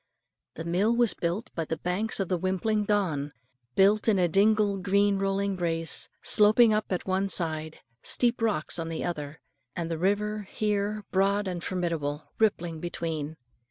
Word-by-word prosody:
The 160 - -6
mill 195 +7 +1
was 240 -2 +4
built 175 +6 -3
by 165 - -2
the 160 - -3
banks 200 +6 -2
of 195 - -1
the 180 -1 -1
wimpling 200 +4 0
Don, 165 -9 -1 0.4
built 205 +3 +3
in 215 -3 +4
a 180 -1 +3
dingle, 205 +3 +3
green 200 +1 +2
rolling 195 0 -1
braes 165 -2 0
sloping 215 +2 +5
up 215 0 0
at 180 - -2
one 190 +1 0
side, 160 -3 +2 0.2
steep 240 -1 +1
rocks 205 -7 0
on 165 0 -4
the 165 - -4
other, 150 -3 -5 0.3
and 170 -1 -3
the 165 - -3
river, 205 +2 -1
here 210 0 -1
broad 200 +1 +1
and 180 -2 -4
fordable, 165 -5 -3
rippling 175 -7 0
between. 160 -2 -4
190 Hz, 160 wpm, -27 LUFS, 165-210 Hz, 0.4 s, sloping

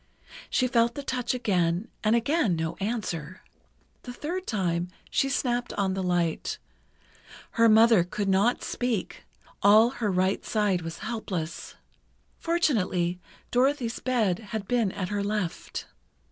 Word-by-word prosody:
She 255 - +2
felt 235 -1 +2
the 285 - -5
touch 250 -2 -1
again, 185 -4 0 0.2
and 215 +1 +4
again 235 - +1
got 160 - -1
no 160 - -3
answer. 190 -5 -4 0.6
The 250 - -8
third 345 +9 -5
time, 175 -5 0 0.2
she 270 - +2
snapped 245 -2 -1
on 195 -2 0
the 190 - -2
light. 175 -3 0 0.9
Her 230 0 +4
mother 220 -3 +6
could 200 +3 -3
not 195 +5 +2
speak—all 220 -1 +1
her 220 -6 -1
right 185 +1 +1
side 205 -5 +1
was 165 0 -6
helpless. 190 -8 -4 0.6
Fortunately, 190 - +1 0.3
Dorothy's 250 -2 +1
bed 220 -8 +1
had 215 -2 -6
been 235 -5 +1
at 185 -1 -4
her 205 -1 -1
left. 205 -4 -3
210 Hz, 130 wpm, -27 LUFS, 185-245 Hz, 0.9 s, mother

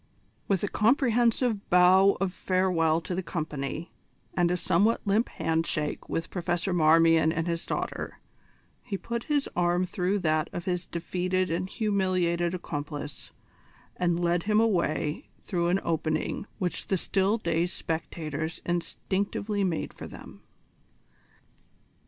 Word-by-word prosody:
With 195 -2 +1
a - - +2
comprehensive 235 -1 +2
bow 185 +2 +6
of 195 -2 -1
farewell 175 -4 +1
to 180 +2 -4
the 185 - -1
company, 155 -2 -4 0.4
and 175 -1 +2
a 180 - +1
somewhat 190 +6 +2
limp 210 +4 +2
handshake 160 -2 -1
with 165 - -3
Professor 175 +1 -1
Marmion 165 -1 +5
and 165 0 -1
his 170 -1 -2
daughter, - - -3 0.6
he 200 - -4
put 235 +5 -4
his 290 -2 +1
arm 175 +1 +2
through 185 +2 0
that 155 -4 +1
of 175 - -5
his 180 -2 -2
defeated 180 +1 -1
and 180 +3 -1
humiliated 185 -5 0
accomplice, 145 -3 -6 0.6
and 175 -1 +1
led 175 0 +2
him 210 0 +4
away 170 -8 0
through 175 -3 0
an 180 +2 +2
opening 160 +4 -1
which 180 -4 -2
the 190 - +1
still 195 +4 +1
dazed 175 -3 0
spectators 160 -1 -4
instinctively 200 +4 -1
made 175 -4 -1
for - - -8
them. - - -12
175 Hz, 130 wpm, -28 LUFS, 165-195 Hz, 0.6 s, bow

